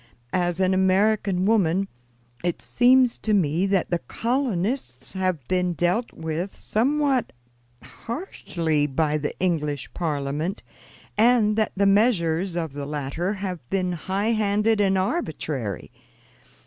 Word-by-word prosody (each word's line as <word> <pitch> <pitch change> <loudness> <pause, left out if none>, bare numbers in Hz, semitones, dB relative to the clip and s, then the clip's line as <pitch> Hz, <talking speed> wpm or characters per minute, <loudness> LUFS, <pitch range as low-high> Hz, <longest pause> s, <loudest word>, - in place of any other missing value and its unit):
As 175 -1 0
an 190 0 +3
American 190 0 +2
woman, 195 -3 +2 0.6
it 175 -1 -1
seems 250 0 +3
to 215 -1 +1
me 175 0 +2
that 195 -3 0
the 175 - +1
colonists 225 - -2
have 185 -8 -2
been 180 -1 +1
dealt 175 - 0
with 165 +4 -4
somewhat 270 +2 +1 0.5
hardly 170 - -2
by 150 +1 0
the 145 - -4
English 150 -6 -1
Parliament, 150 +2 -2 0.6
and 225 -2 +4
that 220 0 0
the 200 - +3
measures 195 -4 +2
of 165 -4 -3
the 140 0 -5
latter 150 +6 -2
have 190 -3 -4
been 185 -2 0
high 190 +6 -1
handed 210 0 +2
and 195 -1 +3
arbitrary. 155 - -2
185 Hz, 120 wpm, -24 LUFS, 160-215 Hz, 0.6 s, and